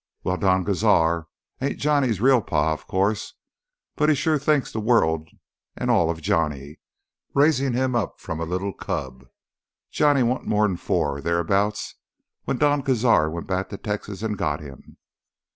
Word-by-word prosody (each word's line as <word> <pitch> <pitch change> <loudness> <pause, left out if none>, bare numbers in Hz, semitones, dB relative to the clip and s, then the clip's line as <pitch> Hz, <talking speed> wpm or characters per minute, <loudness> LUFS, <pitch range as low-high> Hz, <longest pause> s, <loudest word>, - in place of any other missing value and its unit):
"Wal, 90 0 -1
Don 95 -1 +2
Cazar 85 -5 +2 0.3
ain't 140 +1 -1
Johnny's 140 -8 +1
real 130 +1 +4
pa, 80 -4 0
o' - - -4
course. 100 +6 -2 0.6
But 150 - +2
he 155 - +4
shore 155 +1 +1
thinks 145 -1 +1
th' - - -6
world 80 -9 +2 0.5
an' - - -1
all 80 - +3
of 80 -1 -4
Johnny, 75 -3 -1 0.6
raising 140 -2 +3
him 130 +1 0
up 115 -6 -2
from 80 - -5
a 85 - -2
li'l 95 +3 -3
cub. 65 -5 -5 0.6
Johnny 145 -3 +3
warn't 125 +2 -1
more'n 105 -3 +1
four 70 -4 -1
o' - - -8
thereabouts 95 +6 0 0.5
when 130 - -1
Don 145 0 +2
Cazar 115 - +2
went 85 +1 -5
back 95 0 -2
to 100 - -6
Texas 105 -1 -5
an' 110 -1 -1
got 75 -8 -2
him. 70 -3 -13
100 Hz, 160 wpm, -23 LUFS, 80-125 Hz, 0.6 s, real